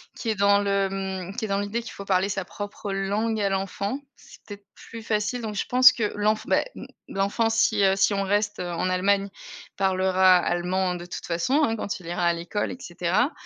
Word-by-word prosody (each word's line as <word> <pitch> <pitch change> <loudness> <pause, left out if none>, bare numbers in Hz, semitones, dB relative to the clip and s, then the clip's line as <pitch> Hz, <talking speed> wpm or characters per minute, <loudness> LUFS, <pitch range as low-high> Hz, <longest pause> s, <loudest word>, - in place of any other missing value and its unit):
qui 230 - -4
est 215 - +1
dans 200 0 +4
le, 200 -1 +1
mmh 190 0 -5
qui 235 -3 -2
est - - -4
dans 195 0 0
l'idée 205 +4 -3
qu'il 230 - -8
faut 200 - -9
parler 190 0 +2
sa 195 -2 -2
propre 205 +1 -7
langue 205 +3 -1
à 200 - +1
l'enfant, 195 +5 -2 0.2
c'est - - -17
peut-être 205 -1 -10
plus 230 -1 -11
facile, 220 +3 -1
donc 220 -2 -4
je 200 - -2
pense 255 +1 +7
que, 220 -4 -2
l'enf 210 +1 0
bah, - - +3
mmh - - -9 0.2
l'enfant 200 +4 0
si, 220 -2 +2
heu 195 0 +4
si 200 +1 +2
on 195 - 0
reste 205 +2 0
en 175 0 -2
Allemagne, 195 +2 +1 0.5
parlera 185 -1 +4
allemand 180 +1 0
de 175 0 -7
toute 175 - -7
façon, 215 - +1
hein, 225 -5 +1
quand 205 -2 -4
il 170 - -12
ira 175 0 -1
à 170 - +3
l'école 170 +5 -3
et - - -7
cetera. 180 - 0
200 Hz, 220 wpm, -25 LUFS, 185-215 Hz, 0.5 s, pense